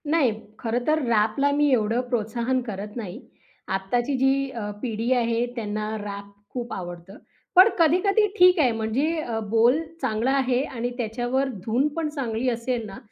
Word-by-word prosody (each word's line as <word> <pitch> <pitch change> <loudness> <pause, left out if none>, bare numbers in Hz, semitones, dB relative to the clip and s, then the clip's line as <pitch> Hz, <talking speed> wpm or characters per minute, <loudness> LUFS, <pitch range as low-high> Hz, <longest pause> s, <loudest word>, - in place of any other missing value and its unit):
नाही. 300 -6 +3 0.3
खरं 240 +1 -2
तर 310 +1 +3
रॅपला 230 +5 +2
मी 295 0 +3
एवढं 230 0 +2
प्रोत्साहन 240 +2 0
करत 205 0 -5
नाही. 200 -6 -6 0.5
आत्ताची 235 +8 -1
जी 270 +1 +2
अ, 220 -4 -5
पिढी 230 0 -2
आहे 235 -1 +1
त्यांना 215 -1 -3
रॅप 200 -1 -7 0.2
खूप 245 -1 -4
आवडतं. 175 +2 -7 0.4
पण 370 +4 +9
कधी-कधी 380 +6 +4
ठीक 360 -1 +6
आहे, 260 -5 +4
म्हणजे 230 +9 0
अ, 230 -6 -3
बोल 230 +6 +4 0.2
चांगला 240 0 0
आहे 255 -1 +1
आणि 245 -3 -3
त्याच्यावर 245 +3 -1 0.2
धून 245 +6 +2
पण 325 -2 -1
चांगली 255 -4 -2
असेल 235 0 -2
ना, 195 -2 -9
240 Hz, 155 wpm, -24 LUFS, 220-270 Hz, 0.5 s, पण